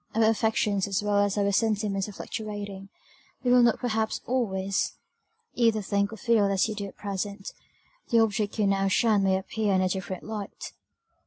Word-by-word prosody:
Our 225 Hz, -, +3 dB
affections 220 Hz, -2 st, +1 dB
as 200 Hz, +1 st, -1 dB
well 205 Hz, -1 st, +2 dB
as 205 Hz, 0 st, +1 dB
our 200 Hz, 0 st, +2 dB
sentiments 210 Hz, -2 st, 0 dB
are -, -, -9 dB
fluctuating; 205 Hz, -2 st, -6 dB, 0.5 s
you 250 Hz, -, +2 dB
will 250 Hz, 0 st, +7 dB
not 235 Hz, -1 st, +4 dB
perhaps 220 Hz, -3 st, -1 dB
always 195 Hz, -6 st, -1 dB, 0.6 s
either 225 Hz, -3 st, +2 dB
think 200 Hz, +1 st, 0 dB
or 225 Hz, -, -8 dB
feel 225 Hz, -1 st, +3 dB
as 195 Hz, 0 st, +2 dB
you 220 Hz, -, -3 dB
do 205 Hz, -1 st, -5 dB
at -, -, -13 dB
present: 200 Hz, 0 st, -4 dB, 0.6 s
the 235 Hz, -, +3 dB
object 215 Hz, -1 st, 0 dB
you 210 Hz, -, +2 dB
now 195 Hz, 0 st, +2 dB
shun 210 Hz, +1 st, +3 dB
may 190 Hz, -1 st, +3 dB
appear 205 Hz, +1 st, -1 dB
in 185 Hz, -, +3 dB
a 185 Hz, -, +1 dB
different 190 Hz, -1 st, -4 dB
light." 210 Hz, -2 st, -6 dB
205 Hz, 180 wpm, -27 LUFS, 195-220 Hz, 0.6 s, will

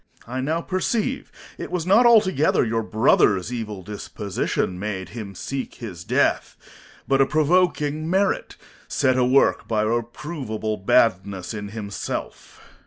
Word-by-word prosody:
Corn. 125 Hz, +2 st, -7 dB
I -, -, -1 dB
now 160 Hz, +5 st, -1 dB
perceive 215 Hz, +8 st, -2 dB, 0.3 s
it -, -, -5 dB
was 180 Hz, -3 st, -2 dB
not 215 Hz, +6 st, +5 dB
altogether 190 Hz, -, +4 dB
your 115 Hz, 0 st, 0 dB
brother's 110 Hz, -2 st, +2 dB
evil 105 Hz, -5 st, -5 dB
disposition 100 Hz, -2 st, -3 dB
made 95 Hz, -2 st, -4 dB
him 105 Hz, -4 st, -8 dB
seek 135 Hz, +8 st, -5 dB
his 90 Hz, -8 st, -8 dB
death; -, -, 0 dB, 0.5 s
but 135 Hz, 0 st, +3 dB
a 135 Hz, -, +4 dB
provoking 155 Hz, -1 st, +1 dB
merit, 190 Hz, +2 st, 0 dB, 0.3 s
set 130 Hz, -1 st, +1 dB
awork 130 Hz, +2 st, +3 dB
by 110 Hz, -2 st, +1 dB
a -, -, 0 dB
reproveable 120 Hz, -2 st, -3 dB
badness 100 Hz, -2 st, +1 dB
in 105 Hz, -1 st, -5 dB
himself. 105 Hz, -2 st, -6 dB
120 Hz, 135 wpm, -23 LUFS, 105-155 Hz, 0.5 s, not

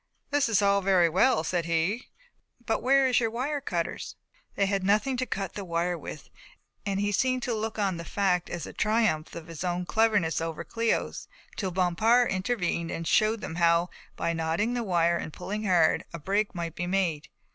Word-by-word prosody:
"This 285 Hz, -4 st, +2 dB
is 210 Hz, -2 st, +3 dB
all 200 Hz, 0 st, +3 dB
very 185 Hz, -3 st, +4 dB
well," 220 Hz, +10 st, +3 dB
said 175 Hz, -2 st, -1 dB
he, 170 Hz, +8 st, 0 dB, 0.6 s
"but 225 Hz, -, 0 dB
where 270 Hz, +2 st, +4 dB
is 255 Hz, -2 st, +3 dB
your 230 Hz, -2 st, 0 dB
wire 275 Hz, +6 st, -2 dB
cutters?" 170 Hz, -8 st, -3 dB, 0.4 s
They 200 Hz, -, +2 dB
had 195 Hz, -1 st, 0 dB
nothing 210 Hz, +7 st, +2 dB
to 255 Hz, 0 st, -1 dB
cut 195 Hz, -2 st, -3 dB
the 205 Hz, -, -5 dB
wire 175 Hz, 0 st, -1 dB
with, -, -, -9 dB, 0.6 s
and 195 Hz, -1 st, 0 dB
he 205 Hz, 0 st, 0 dB
seemed 255 Hz, +4 st, +1 dB
to 245 Hz, -, -1 dB
look 220 Hz, 0 st, -3 dB
on 195 Hz, -4 st, 0 dB
the 170 Hz, -, -6 dB
fact 180 Hz, -1 st, 0 dB
as 170 Hz, -3 st, -4 dB
a -, -, -9 dB
triumph 215 Hz, -8 st, +1 dB
of 165 Hz, -, -7 dB
his 165 Hz, 0 st, -7 dB
own 180 Hz, 0 st, -1 dB
cleverness 205 Hz, -7 st, +2 dB
over 165 Hz, -1 st, -4 dB
Cléo's, 230 Hz, 0 st, -1 dB, 0.3 s
till 195 Hz, -, -2 dB
Bompard 190 Hz, +7 st, +3 dB
intervened 185 Hz, -4 st, -1 dB
and 165 Hz, 0 st, -4 dB
shewed 215 Hz, +4 st, +2 dB
how, 170 Hz, 0 st, +3 dB, 0.2 s
by 170 Hz, -, -1 dB
knotting 165 Hz, +8 st, 0 dB
the 245 Hz, -, -1 dB
wire 170 Hz, -5 st, +2 dB
and 165 Hz, -, -5 dB
pulling 215 Hz, +2 st, -4 dB
hard, 175 Hz, -5 st, +3 dB
a -, -, -4 dB
break 200 Hz, +6 st, -1 dB
might 170 Hz, -2 st, -4 dB
be 175 Hz, -, -4 dB
made. 175 Hz, -5 st, -1 dB
195 Hz, 190 wpm, -27 LUFS, 170-220 Hz, 0.6 s, very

